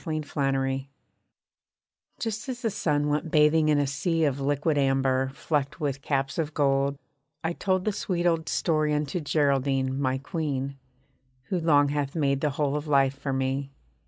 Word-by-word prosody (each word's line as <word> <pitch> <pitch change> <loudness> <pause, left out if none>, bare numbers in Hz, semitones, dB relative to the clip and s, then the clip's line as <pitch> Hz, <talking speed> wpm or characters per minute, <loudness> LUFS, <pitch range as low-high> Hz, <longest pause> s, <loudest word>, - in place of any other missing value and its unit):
GERALDINE 135 -4 -1 1.3
Just 225 +2 -3
as 250 -1 -5
the 225 - +1
sun 145 -5 0
went 150 +2 -1
bathing 155 0 +4
in 150 - +4
a 145 - +2
sea 160 +5 0
Of 140 -1 0
liquid 145 +3 0
amber, 135 -1 +2
flecked 145 -1 -1
with 140 -2 -2
caps 135 +1 -1
of 155 -2 -2
gold, 140 -1 +2 0.5
I 165 +1 0
told 185 +1 0
The 215 - +2
sweet 180 -4 -2
old 165 -2 +1
story 155 -3 +1
unto 150 +3 -1
Geraldine, 135 -3 +1
my 130 -1 +1
Queen, 140 -2 -3 0.7
Who 185 - 0
long 145 -3 +4
hath 145 0 -2
made 140 -3 +1
the 150 - +2
whole 145 0 -1
of 150 +1 -3
life 135 -2 +3
for 140 0 -4
me. 135 +1 -1
145 Hz, 160 wpm, -27 LUFS, 135-155 Hz, 1.3 s, bathing